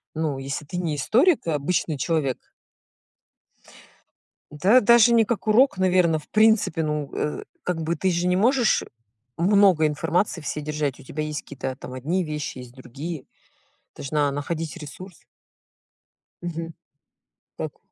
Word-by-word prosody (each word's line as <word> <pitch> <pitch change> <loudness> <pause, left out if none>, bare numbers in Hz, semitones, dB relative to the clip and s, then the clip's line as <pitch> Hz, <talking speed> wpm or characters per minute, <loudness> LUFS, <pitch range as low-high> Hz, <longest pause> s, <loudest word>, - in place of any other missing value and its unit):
Ну 155 -4 -1
если 135 +2 -4
ты 175 +4 -6
не 165 -4 -1
историк, 245 - +3
а 160 - +1
обычный 155 +1 -1
человек. 140 -3 -2 2.0
Да 195 +12 +4
даже 235 +2 +6
не 230 -1 +5
как 225 0 -3
урок, 230 0 +4
наверно, 180 -4 +3
в 150 - -18
принципе, 215 -7 +3
ну 150 -2 -2
Э, 150 - -3 0.2
как 175 -3 -2
бы 170 +2 -1
ты 185 +4 0
же 175 +1 0
не 180 - +2
можешь 240 +3 +3 0.5
много 185 -3 +4
информации 165 +4 -1
всей 150 +1 -4
держать. 150 -2 -3
У - - -13
тебя 155 +3 -4
есть 150 -1 -4
какие-то 130 -2 -6
там 125 - -9
одни 165 +9 -1
вещи, 150 -3 -5
есть 125 -1 -11
другие. 135 +4 -7 0.7
Должна 145 0 0
находить 155 +3 -4
ресурс. 175 +3 -10 1.2
Мгм. 165 -1 -5 0.8
Так. - - -5
165 Hz, 140 wpm, -24 LUFS, 150-185 Hz, 2.0 s, даже